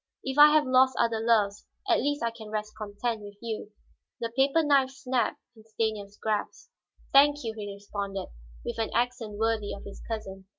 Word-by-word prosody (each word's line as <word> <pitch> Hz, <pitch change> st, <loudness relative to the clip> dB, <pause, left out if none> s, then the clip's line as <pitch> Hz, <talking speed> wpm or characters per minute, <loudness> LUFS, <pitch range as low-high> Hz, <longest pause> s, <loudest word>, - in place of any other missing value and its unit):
"If 265 Hz, +2 st, -2 dB
I 295 Hz, -, +11 dB
have 305 Hz, -1 st, +4 dB
lost 255 Hz, 0 st, +4 dB
other 230 Hz, -1 st, +2 dB
loves, 215 Hz, -3 st, +2 dB, 0.2 s
at 350 Hz, -3 st, +4 dB
least 290 Hz, -2 st, -1 dB
I 230 Hz, -, +1 dB
can 225 Hz, -2 st, -11 dB
rest 215 Hz, 0 st, -3 dB
content 215 Hz, +2 st, -3 dB
with 205 Hz, 0 st, -10 dB
you." 220 Hz, -2 st, -5 dB, 0.5 s
The 230 Hz, -1 st, -4 dB
paper 275 Hz, +4 st, +3 dB
knife 280 Hz, -3 st, +4 dB
snapped 260 Hz, -3 st, -1 dB, 0.2 s
in 220 Hz, -, -17 dB
Stanief's 215 Hz, -2 st, -3 dB
grasp. 215 Hz, -2 st, -3 dB, 0.4 s
"Thank 290 Hz, +1 st, +6 dB
you," 225 Hz, -1 st, -3 dB
he 205 Hz, -2 st, -5 dB
responded, 200 Hz, -1 st, -5 dB, 0.4 s
with -, -, -4 dB
an 225 Hz, -, 0 dB
accent 240 Hz, -4 st, -1 dB
worthy 220 Hz, -1 st, 0 dB
of 200 Hz, -, -11 dB
his 200 Hz, -, -10 dB
cousin. 195 Hz, -4 st, -6 dB
225 Hz, 180 wpm, -28 LUFS, 210-260 Hz, 0.5 s, I